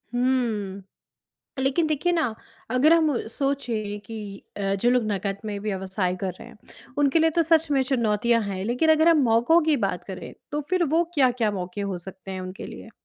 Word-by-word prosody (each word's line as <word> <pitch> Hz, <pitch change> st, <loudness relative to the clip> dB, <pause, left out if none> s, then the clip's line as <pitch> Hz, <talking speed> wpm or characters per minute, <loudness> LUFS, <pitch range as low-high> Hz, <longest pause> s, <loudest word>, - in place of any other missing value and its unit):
हुँ। 230 Hz, -6 st, 0 dB, 0.8 s
लेकिन 270 Hz, +5 st, +1 dB
देखिए 310 Hz, +3 st, +1 dB
ना, 315 Hz, -10 st, +1 dB, 0.4 s
अगर 270 Hz, +6 st, +5 dB
हम 310 Hz, -8 st, +2 dB
सोचें 230 Hz, -5 st, -2 dB
कि 210 Hz, -3 st, -8 dB
अ, 195 Hz, -1 st, 0 dB
जो 235 Hz, +5 st, +2 dB
लोग 250 Hz, -1 st, +3 dB
नकद 195 Hz, 0 st, -2 dB
में 210 Hz, -1 st, -3 dB
व्यवसाय 190 Hz, -2 st, -2 dB
कर 190 Hz, -1 st, -1 dB
रहे -, -, -10 dB
हैं, 235 Hz, -2 st, -15 dB, 0.4 s
उनके 290 Hz, +2 st, +3 dB
लिए 325 Hz, 0 st, +4 dB
तो 335 Hz, +1 st, +2 dB
सच 325 Hz, 0 st, +3 dB
में 275 Hz, -2 st, +3 dB
चुनौतियाँ 235 Hz, -2 st, +1 dB
हैं। 195 Hz, -2 st, -4 dB
लेकिन 250 Hz, +8 st, +1 dB
अगर 315 Hz, +1 st, +4 dB
हम 330 Hz, -3 st, +5 dB
मौकों 240 Hz, +8 st, +4 dB
की 310 Hz, -1 st, +3 dB
बात 190 Hz, -6 st, -2 dB
करें, 190 Hz, -1 st, -8 dB, 0.2 s
तो 295 Hz, +1 st, -1 dB
फ़िर 365 Hz, -1 st, +2 dB
वो 335 Hz, +1 st, +4 dB
क्या-क्या 250 Hz, -7 st, +2 dB
मौके 185 Hz, 0 st, -5 dB
हो 200 Hz, -2 st, -2 dB
सकते 190 Hz, 0 st, -9 dB
हैं 190 Hz, -1 st, -4 dB
उनके 185 Hz, +1 st, -7 dB
लिए? -, -, -10 dB
235 Hz, 190 wpm, -25 LUFS, 200-290 Hz, 0.8 s, अगर